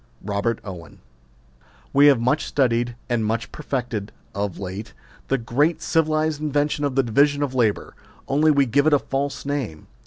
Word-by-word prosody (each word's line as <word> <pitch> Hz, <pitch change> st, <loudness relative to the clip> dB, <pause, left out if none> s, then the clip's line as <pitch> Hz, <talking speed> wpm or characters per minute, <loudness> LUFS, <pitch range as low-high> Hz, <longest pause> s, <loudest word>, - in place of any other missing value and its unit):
ROBEET 105 Hz, +3 st, -1 dB
OWEX. 90 Hz, -5 st, -9 dB, 1.0 s
We 145 Hz, +1 st, +7 dB
have 140 Hz, -4 st, +6 dB
much 130 Hz, +6 st, +1 dB
studied 120 Hz, -3 st, +1 dB
and 120 Hz, -3 st, 0 dB
much 110 Hz, +2 st, -2 dB
perfected, 125 Hz, -8 st, -4 dB, 0.2 s
of 100 Hz, -2 st, -3 dB
late, 95 Hz, +3 st, -6 dB, 0.3 s
the 135 Hz, -, +1 dB
great 140 Hz, +8 st, +1 dB
civilised 155 Hz, -2 st, +1 dB
invention 145 Hz, 0 st, 0 dB
of 140 Hz, -3 st, -2 dB
the 135 Hz, -, +3 dB
division 145 Hz, +5 st, +2 dB
of 135 Hz, -3 st, -2 dB
labour; 115 Hz, -5 st, 0 dB, 0.3 s
only 150 Hz, +3 st, +3 dB
we 140 Hz, -2 st, +4 dB
give 140 Hz, +5 st, +2 dB
it 155 Hz, -, +4 dB
a -, -, +7 dB
false 140 Hz, +1 st, -3 dB
name. 135 Hz, -, -3 dB
135 Hz, 160 wpm, -23 LUFS, 115-145 Hz, 1.0 s, We